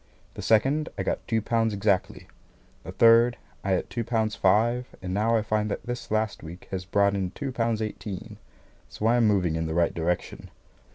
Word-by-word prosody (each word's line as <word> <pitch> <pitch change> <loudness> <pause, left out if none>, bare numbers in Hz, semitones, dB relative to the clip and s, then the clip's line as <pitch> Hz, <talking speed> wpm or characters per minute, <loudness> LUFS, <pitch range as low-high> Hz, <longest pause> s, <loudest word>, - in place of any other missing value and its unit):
The - - -7
second, 135 +8 +2
I - - -1
got - - -3
two 110 -2 0
pounds 115 -2 +1
exactly. 100 -1 0 0.6
The - - -7
third, 115 +1 +5 0.3
I 95 - +1
had 90 - -1
two 120 - -3
pounds 110 -2 0
five, 115 +6 +2
and 90 -1 -5
now 110 +3 +2
I 110 - 0
find 110 0 0
that - - -4
this 120 0 -5
last 110 -1 -1
week 85 +3 -10
has 95 -1 -4
brought 100 +2 +2
in 95 -2 -1
two 135 +7 -5
pounds 115 -2 -1
eighteen; 105 -3 -6 0.5
so 105 - -5
I 115 +2 +4
am 115 -2 +4
moving 90 -6 +2
in 80 0 -2
the 80 - -3
right 85 -1 +2
direction. 85 +1 -3
110 Hz, 195 wpm, -26 LUFS, 95-115 Hz, 0.6 s, third